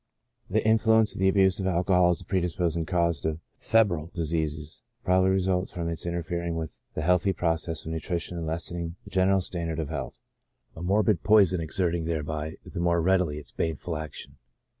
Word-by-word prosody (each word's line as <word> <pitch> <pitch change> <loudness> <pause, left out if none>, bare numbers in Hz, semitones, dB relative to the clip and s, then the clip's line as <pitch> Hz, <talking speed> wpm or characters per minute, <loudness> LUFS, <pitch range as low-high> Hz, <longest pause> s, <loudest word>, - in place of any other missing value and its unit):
This - - +1
influence 110 0 +4
of - - -7
the 95 - +4
abuse 95 0 +3
of 95 - -1
alcohol 90 0 +3
as 90 - 0
a - - -12
pre 95 +1 0
disposing 85 -2 -1
cause 85 -4 +1
to 80 -1 -1 0.2
febrile 95 -8 +2
diseases 80 -2 -2 0.2
probably 95 +1 +4
results 95 -1 +1
from 85 -1 -3
its 85 +1 -5
interfering 85 0 -2
with 80 -1 -6
the 80 - -2
healthy 90 +3 +3
process 80 -2 -2
of 80 - -4
nutrition 85 +2 -3
and 85 -2 -4
lessen 85 +2 -3
ing 85 0 -4
the - - -13
general 95 +1 +3
standard 85 -3 -4
of 80 -3 -3
health 80 - -4 0.6
j - - -11
a - - -7
morbid 100 0 +2
poison 100 -4 +4
exert 85 +2 -1
ing 85 -2 -2
thereby 80 -1 -3
the - - -6
more 85 0 +2
readily 90 -3 +2
its 75 - -8
baneful 80 +1 -3
action. 80 0 -7
85 Hz, 190 wpm, -27 LUFS, 80-95 Hz, 0.6 s, influence